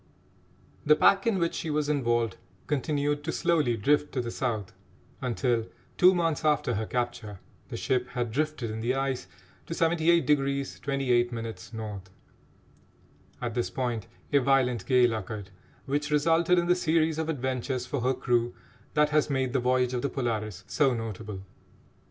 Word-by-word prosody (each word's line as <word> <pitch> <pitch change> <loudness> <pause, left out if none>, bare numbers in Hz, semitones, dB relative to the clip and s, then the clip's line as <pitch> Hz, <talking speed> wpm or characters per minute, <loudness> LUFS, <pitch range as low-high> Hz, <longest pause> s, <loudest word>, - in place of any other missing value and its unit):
The 150 +1 +6
pack 195 +6 +4
in 220 -4 +2
which 170 -2 0
she 165 - -4
was 150 -1 0
involved 120 -7 +1 0.3
continued 145 +1 -1
to 165 - -2
slowly 155 -10 +1
drift 145 +7 +2
to 130 - -1
the 120 -1 -4
South 110 -7 -3 0.5
until, 120 -2 0 0.3
two 185 +1 +6
months 165 -3 0
after 150 -5 +2
her 110 0 -2
capture, 120 -5 -3 0.3
the - - -5
ship 125 -1 0
had 120 -2 -3
drifted 145 -3 -1
in 110 - -5
the 120 +3 0
ice 135 -1 -2 0.4
to 165 - -4
78° 155 -5 +2
28' 125 -4 +1
N. 110 -2 -6 1.4
At 120 -1 -2
this 120 0 -1
point 120 -5 -3 0.3
a 140 - +6
violent 125 -5 +2
gale 125 -2 +4
occurred, 105 -2 -5 0.3
which 145 +2 -1
resulted 165 +4 +3
in 175 - +2
the 175 - +4
series 160 -2 +1
of 160 0 -2
adventures 130 -3 -2
for 140 0 -3
her 130 +2 +1
crew 120 -1 0 0.4
that 150 0 +4
has 150 0 +2
made 130 -3 0
the 135 - +2
voyage 125 0 +1
of 125 - -1
the 140 - -1
Polaris 110 -6 -3
so 135 -4 +2
notable. 110 -3 -5
130 Hz, 155 wpm, -28 LUFS, 120-150 Hz, 1.4 s, The